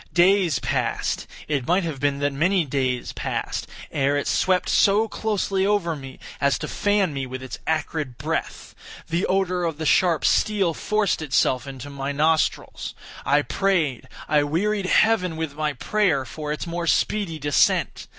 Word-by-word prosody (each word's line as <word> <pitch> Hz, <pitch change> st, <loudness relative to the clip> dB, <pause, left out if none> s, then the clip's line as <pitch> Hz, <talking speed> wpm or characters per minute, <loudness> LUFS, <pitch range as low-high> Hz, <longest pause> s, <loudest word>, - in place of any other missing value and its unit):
Days 180 Hz, -4 st, +4 dB
passed—it 135 Hz, +3 st, -2 dB
might 180 Hz, +3 st, +2 dB
have 160 Hz, -5 st, -4 dB
been 140 Hz, 0 st, +1 dB
that 145 Hz, 0 st, +1 dB
many 170 Hz, +5 st, +2 dB
days 130 Hz, -3 st, -1 dB
passed—ere 140 Hz, +1 st, -2 dB
it 145 Hz, -, -2 dB
swept 185 Hz, -1 st, +2 dB
so 210 Hz, +3 st, +4 dB
closely 200 Hz, -3 st, -1 dB
over 195 Hz, -5 st, +1 dB
me 135 Hz, -2 st, -10 dB, 0.2 s
as 140 Hz, -1 st, +3 dB
to -, -, -5 dB
fan 205 Hz, -5 st, +1 dB
me 135 Hz, -1 st, -3 dB
with 130 Hz, +1 st, -7 dB
its 130 Hz, -2 st, -7 dB
acrid 155 Hz, -4 st, -2 dB
breath. -, -, -4 dB, 0.4 s
The 170 Hz, +2 st, 0 dB
odor 185 Hz, -2 st, 0 dB
of 165 Hz, -3 st, -2 dB
the 160 Hz, -, -4 dB
sharp 170 Hz, 0 st, +3 dB
steel 200 Hz, -5 st, +2 dB
forced 210 Hz, 0 st, 0 dB
itself 130 Hz, -3 st, +1 dB
into 135 Hz, +1 st, -8 dB
my 140 Hz, 0 st, -3 dB
nostrils. 155 Hz, +2 st, 0 dB, 0.3 s
I 145 Hz, +1 st, +4 dB
prayed—I 150 Hz, -, 0 dB
wearied 190 Hz, +7 st, 0 dB
heaven 185 Hz, -6 st, +3 dB
with 160 Hz, -3 st, -3 dB
my 150 Hz, 0 st, -1 dB
prayer 160 Hz, -1 st, +1 dB
for 150 Hz, +1 st, -6 dB
its 150 Hz, -, -3 dB
more 170 Hz, 0 st, -3 dB
speedy 190 Hz, -2 st, +1 dB
descent. 145 Hz, -1 st, +1 dB
160 Hz, 150 wpm, -23 LUFS, 140-190 Hz, 0.4 s, Days